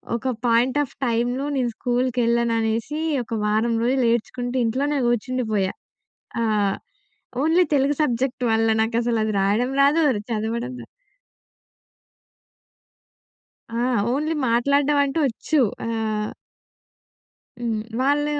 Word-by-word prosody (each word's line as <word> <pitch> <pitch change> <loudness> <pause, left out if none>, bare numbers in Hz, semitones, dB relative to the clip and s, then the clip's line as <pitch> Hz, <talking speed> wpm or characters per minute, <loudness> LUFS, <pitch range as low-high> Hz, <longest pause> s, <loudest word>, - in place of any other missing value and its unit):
ఒక 235 +3 -2 0.2
point 240 +3 +3
of 275 - -9
టైమ్‌లో‌ 245 +3 0
నేను 255 -3 +1
స్కూల్‌కెళ్ళననేసి 235 +1 0 0.2
ఒక 230 - -8
వారం 220 +3 +1
రోజులు 255 +1 +2
ఏడ్చుకుంటూ 245 +2 -3
ఇంట్లోనే 280 +6 0
కూర్చుండిపోయా! 230 -5 0 0.7
ఆహ్, 210 -3 +1 0.7
ఓన్లీ 330 +4 +4
తెలుగు 280 +1 +2
సబ్జెక్ట్ 255 -1 -1
వల్ల 225 0 +2
నాకసల 230 0 0
అది 215 - -2
రాయడం 210 +6 +1
రాదు, 290 +4 +4
అది 210 - -3
చదవడం 230 +3 -2
రాదు. - - -12 2.9
ఆ! - - -2 0.3
ఓన్లీ 305 +5 0
మాట్లాడడం 280 +5 +2
అంటూ 280 +3 -2
వచ్చు. 275 +5 0 0.3
ఆహ్ 220 -2 -2 1.3
హ్మ్. 225 -3 -1 0.2
వాళ్ళు 290 +2 +2
240 Hz, 105 wpm, -23 LUFS, 225-270 Hz, 2.9 s, ఓన్లీ